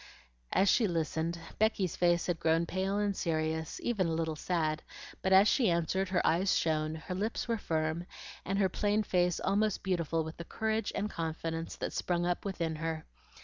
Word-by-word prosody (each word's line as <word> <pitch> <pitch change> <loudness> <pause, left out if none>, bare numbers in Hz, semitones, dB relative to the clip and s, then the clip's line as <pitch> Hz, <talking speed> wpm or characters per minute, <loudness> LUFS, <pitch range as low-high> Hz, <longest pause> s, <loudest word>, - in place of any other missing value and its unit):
As 195 - +3
she 225 +2 +4
listened, 165 0 -1 0.2
Becky's 210 -5 +2
face 175 -1 +3
had 175 -3 -1
grown 165 +1 +2
pale 190 +3 -1
and 205 -1 0
serious, 160 -2 -1
even 210 -7 +1
a 165 - 0
little 160 -1 -1
sad; 155 -1 -1 0.4
but 190 - 0
as 190 +2 +7
she 235 -4 +3
answered, 175 +3 0
her 185 -2 +1
eyes 180 +4 +3
shone, 155 -1 0
her 160 +3 -6
lips 210 +7 -2
were 230 -2 0
firm, 160 0 -1 0.4
and 195 +2 -1
her 195 -1 +4
plain 210 +3 +1
face 180 -3 +1
almost 210 0 +1
beautiful 165 -3 0
with 160 0 -7
the 170 - -5
courage 220 +4 -1
and 210 +1 -1
confidence 165 0 -3
that - - -4
sprung 175 -1 0
up 175 +2 -1
within 170 -5 -2
her. 160 0 -3
175 Hz, 185 wpm, -32 LUFS, 160-195 Hz, 0.4 s, as